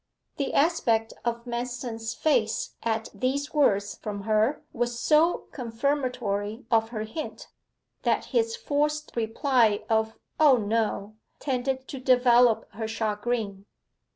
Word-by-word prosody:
The 280 - -2
aspect 235 -8 +2
of 235 0 -2
Manston's 240 -2 -4
face 245 -8 +1
at 225 -1 -1
these 280 +3 -2
words 205 -9 +2
from 205 -1 -5
her 220 +6 +1
was 240 0 -2
so 315 +5 +3
confirmatory 235 -4 -2
of 225 -1 +3
her 220 -2 -4
hint, 225 +9 -7 0.5
that - - +1
his 460 -1 +2
forced 300 -4 -1
reply 225 -2 +2
of 220 0 +1 0.2
'O 290 -5 +7
no,' 215 -1 -1 0.2
tended 260 -1 -2
to 270 - -5
develop 245 -2 +4
her 220 +2 -4
chagrin. 215 -2 -2
235 Hz, 120 wpm, -27 LUFS, 220-270 Hz, 0.5 s, O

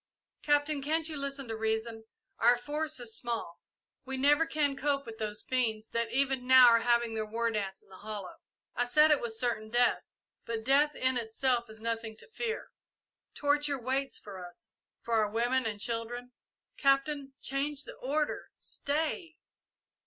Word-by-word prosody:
"Captain, 290 0 +2
can't 315 +3 0
you 310 - -2
listen 275 -2 -2
to 225 - -3
reason? 220 0 -2 0.3
Our 240 +1 +5
force 300 +4 -2
is 230 -2 -3
small. 230 -8 -4 0.4
We 265 0 -5
never 295 +4 +4
can 295 -3 +1
cope 280 0 0
with 225 -1 -9
those 210 -1 -3
fiends 225 -4 -1
that 230 -1 -1
even 265 0 0
now 260 -1 +9
are 230 0 +5
having 235 -1 +2
their 220 -1 -1
war 230 +2 -1
dance 195 -3 -3
in - - -27
the 190 - -13
hollow. 210 -3 -7 0.4
I 245 - +1
said 305 +5 +5
it 295 - +4
was 225 -2 -4
certain 230 -3 -1
death, 240 +2 +3 0.4
but 230 -1 -4
death 280 +4 +3
in 260 0 +1
itself 235 +1 0
is 220 0 -11
nothing 225 -1 -3
to - - -14
fear. 450 0 -4 0.6
Torture 290 -1 +1
waits 265 +3 -1
for 190 -3 -9
us 175 -1 -11 0.3
for 235 - -3
our 210 - -1
women 240 +3 +1
and 210 -2 -4
children. 240 +3 -3 0.5
Captain, 275 0 +1
change 280 +1 -2
the - - -9
order 295 +3 -2
stay!" 320 +3 -2
245 Hz, 165 wpm, -31 LUFS, 225-280 Hz, 0.6 s, now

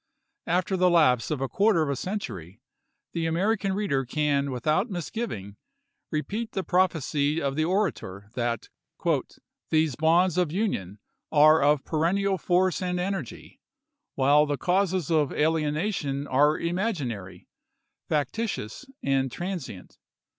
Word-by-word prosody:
After 180 +3 +1
the 185 0 +4
lapse 140 -9 +3
of 150 -4 -2
a 135 - 0
quarter 200 0 +3
of 150 - -2
a - - -1
century, 115 - -5 0.5
the 165 -1 -1
American 195 +4 0
reader 190 -10 0
can 140 +1 0
without 155 - 0
misgiving 175 - -5 0.5
repeat 210 +10 -3
the 190 - -2
prophecy 160 -5 +1
of 140 -3 -2
the 155 +1 +1
orator, 160 - -2
that 120 -2 -2 0.7
" - - -34
These 155 -4 +2
bonds 170 +4 +3
of 175 -4 +1
Union 155 - -2 0.3
are 155 +1 +6
of 145 0 +3
perennial 190 +5 +1
force 185 0 +1
and 180 -1 -1
energy, 180 - -5 0.6
while 145 +3 +4
the 145 -1 -1
causes 185 0 0
of 150 -4 +2
alienation 155 -1 0
are 145 +3 +3
imaginary, 165 - -3 0.6
factitious, 150 - -2 0.2
and 135 -1 +1
transient. 175 - -6
155 Hz, 125 wpm, -26 LUFS, 140-185 Hz, 0.7 s, are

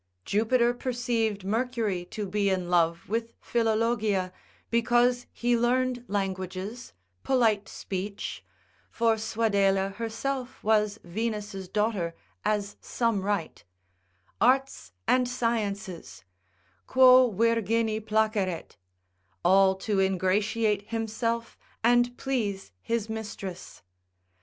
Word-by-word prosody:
Jupiter 235 +3 +2
perceived 235 -5 -1
Mercury 220 -4 -1
to 210 +2 -5
be 200 +1 +1
in 185 -2 -1
love 170 -1 +2
with 230 +2 -3
Philologia, 220 -5 0 0.4
because 245 +1 +2
he 240 0 +1
learned 245 +1 +1
languages, 195 +3 -4 0.3
polite 225 -6 +2
speech, 195 +1 -5 0.5
(for 230 -1 +2
Suadela 200 -3 +1
herself 250 +3 -4
was 210 -1 +2
Venus' 205 0 -4
daughter, 200 -4 -1 0.3
as 205 -1 -1
some 230 -5 0
write) 200 -4 -2 0.8
arts 255 - +2 0.2
and 250 -1 +3
sciences, 205 - -3 0.6
quo 255 -1 +7
virgini 225 +1 +1
placeret, 215 - -1 0.7
all 190 +1 +5
to 195 +1 -1
ingratiate 200 +3 +1
himself, 230 +1 -2 0.2
and 240 +1 +3
please 210 - -2
his 230 -2 -1
mistress. 215 -5 -7
220 Hz, 95 wpm, -27 LUFS, 195-235 Hz, 0.8 s, quo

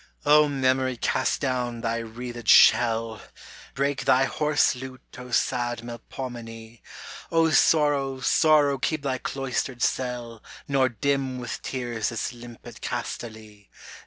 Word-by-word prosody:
O 150 +1 +6
Memory 130 -2 0
cast - - 0
down 125 -4 -2
thy 115 0 -1
wreathed 120 +1 -8
shell! 115 -2 +5 0.5
Break 140 0 -1
thy 130 +1 +4
hoarse 150 +2 +1
lute 130 0 -11
O 125 0 -9
sad 120 -1 -1
Melpomene! 120 -2 -8 0.5
O 165 -1 +3
Sorrow, 145 -2 +3
Sorrow 145 0 +3
keep 155 +1 -2
thy 130 -2 -2
cloistered 130 -2 -3
cell 120 -3 -2 0.3
Nor 135 -2 +2
dim 135 +2 -1
with 125 -2 -6
tears 120 -4 -3
this 115 +2 -4
limpid 120 -1 -12
Castaly 110 -3 -6
125 Hz, 120 wpm, -25 LUFS, 115-135 Hz, 0.5 s, O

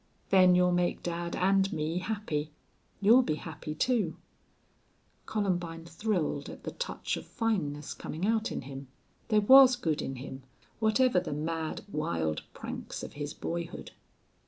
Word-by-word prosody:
"Then 185 -2 +7
you'll 180 0 +4
make 175 0 0
dad 170 0 -3
and 195 +1 +3
me 160 +1 -1
happy. 180 -7 -2 0.5
You'll 225 +6 +7
be 200 -11 -1
happy, 155 -1 -7
too." 240 +6 +1 1.1
Columbine 175 -6 -2
thrilled 170 -5 -2
at - - -10
the - - -4
touch - - -3
of - - -8
fineness 150 -11 -2
coming 165 +5 -4
out 220 +1 +1
in - - -3
him. 135 +1 -8 0.4
There 215 -2 +4
was 260 +3 +8
good 160 -11 -1
in 135 - -4
him, 130 +1 -8 0.4
whatever 220 -1 +3
the 175 -4 -4
mad, 160 +1 -3
wild 80 - -1
pranks - - -6
of - - -7
his 145 0 -5
boyhood. 170 0 -5
175 Hz, 145 wpm, -30 LUFS, 150-210 Hz, 1.1 s, was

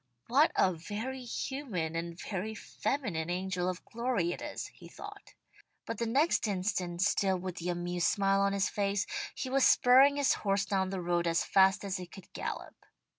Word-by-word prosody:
"What 280 +7 +4
a 185 - +3
very 220 +10 -5
human 230 - -3
and 170 +1 -4
very 210 +2 -4
feminine 205 - -3
angel 180 0 -1
of 180 -1 -6
glory 235 -7 -1
it - - -5
is," - - -5
he - - -13
thought. - - -11 0.5
But 230 - -5
the 235 - 0
next 275 +1 +2
instant, 185 -3 -1
still 190 -1 +2
with 180 -1 -6
the 175 +1 -3
amused 175 0 0
smile 195 -1 +2
on 200 0 +2
his 200 -1 +1
face, 200 0 0 0.3
he 265 - -4
was 270 +1 +2
spurring 265 +3 +6
his 285 -2 +3
horse 195 -1 +1
down 190 -2 0
the 190 -1 -3
road 175 0 +1
as 165 0 +2
fast 190 +1 +4
as 195 -1 -2
it 180 -1 -9
could 195 - -13
gallop. - - -5
195 Hz, 180 wpm, -31 LUFS, 175-230 Hz, 0.5 s, spurring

